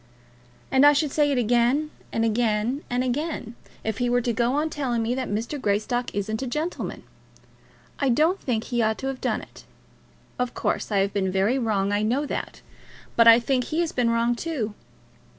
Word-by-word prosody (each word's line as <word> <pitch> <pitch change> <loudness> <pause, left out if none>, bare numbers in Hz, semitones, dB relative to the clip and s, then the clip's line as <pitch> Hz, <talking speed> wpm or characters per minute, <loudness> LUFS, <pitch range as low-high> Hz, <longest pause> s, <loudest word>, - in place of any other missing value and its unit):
"And 265 +1 +4
I 290 0 +8
should 295 0 0
say 295 0 +2
it 275 - +1
again 245 +6 +2 0.2
and 225 - 0
again 225 +3 0
and 245 +1 0
again, 255 -2 -3 0.3
if 220 -1 -3
he 245 0 +1
were 245 0 +2
to 240 0 -1
go 235 +3 +1
on 310 +2 0
telling 245 -6 -1
me 230 +2 0
that 255 0 -3
Mr. 230 +7 -3
Greystock 220 +4 0
isn't 215 +3 -2
a 265 - -3
gentleman. 305 +8 -4 1.0
I 275 - +2
don't 315 +10 +3
think 225 -4 -1
he 240 -1 -1
ought 220 0 +1
to 270 - -4
have 265 -1 -6
done - - -1
it. - - -14 0.8
Of 250 -1 -2
course, - - -1
I 205 - +2
have 195 0 -1
been 190 -2 0
very 200 +8 +1
wrong; 205 -4 0
I 205 0 +1
know 250 +7 +1
that. - - -5 0.5
But 230 0 +5
I 230 +1 +9
think 250 +1 0
he 320 +2 -1
has 335 - -1
been 245 -2 +1
wrong 230 +1 +2
too. 240 -8 -3
245 Hz, 200 wpm, -25 LUFS, 220-275 Hz, 1.0 s, I